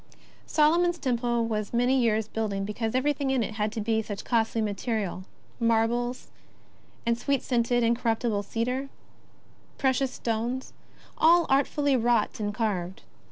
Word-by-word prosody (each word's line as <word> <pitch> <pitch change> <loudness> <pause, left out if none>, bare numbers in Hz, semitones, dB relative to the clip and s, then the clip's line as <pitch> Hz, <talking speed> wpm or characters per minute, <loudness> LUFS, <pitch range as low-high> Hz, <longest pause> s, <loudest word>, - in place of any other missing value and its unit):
Solomon's 340 +3 +3
Temple 240 -4 0
was 215 -1 -3
many 245 +2 +3
years 220 -3 +1
building 210 -3 -2
because 220 +2 -3
everything 280 +1 +1
in 265 -3 +2
it 215 - -4
had 210 0 -1
to 220 - -3
be 220 +1 +1
of 220 - -5
such 205 -2 -5
costly 225 -1 +1
material 205 -3 -2 0.2
— - - -32
marbles, 240 +3 0 0.8
and 235 0 +2
sweet 275 +2 -1
scented, 240 -1 +1
incorruptible 230 -2 +1
cedar, 235 +5 -2
and 275 0 -7 0.9
precious 265 0 +1
stones, 235 +3 -3 0.5
all 340 +1 +6
" - - -27
artfully 280 +1 +2
wrought 235 -3 +1
and 205 -1 -1
carved. 195 -5 -2
235 Hz, 150 wpm, -27 LUFS, 220-260 Hz, 0.9 s, all